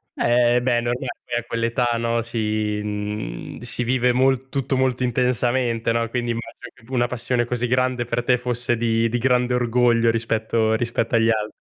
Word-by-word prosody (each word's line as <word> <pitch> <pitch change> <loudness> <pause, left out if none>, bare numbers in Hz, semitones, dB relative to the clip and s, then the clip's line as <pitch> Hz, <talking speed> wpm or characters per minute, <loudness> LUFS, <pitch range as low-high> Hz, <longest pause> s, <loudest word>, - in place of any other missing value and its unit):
Eh, 120 0 +3
beh 125 -1 +2
è 120 - +1
normale, 120 +2 -2 0.3
a 120 - -3
quell'età, 115 +1 -1
no, 115 0 0
si 110 -2 -2
mhmm, 105 - -5
si 120 0 +2
vive 125 0 +2
molto 130 +1 +2
tutto 135 -1 -1
molto 130 -1 0
intensamente, 125 -1 +1
no, 115 0 0
quindi 120 -1 -2
immagino 115 +1 -7
che 125 - -23
una 120 -2 +2
p 120 - -5
passione 120 0 -1
così 125 0 -1
grande 125 0 0
per 120 0 -2
te 125 0 +3
fosse 120 -1 0
di 115 0 +1
di 120 - -1
grande 125 0 +2
orgoglio, 120 -1 +2
rispetto 110 0 0
rispetto 115 +1 -1
agli 115 0 +3
al 110 -1 0
120 Hz, 180 wpm, -22 LUFS, 115-125 Hz, 0.3 s, Eh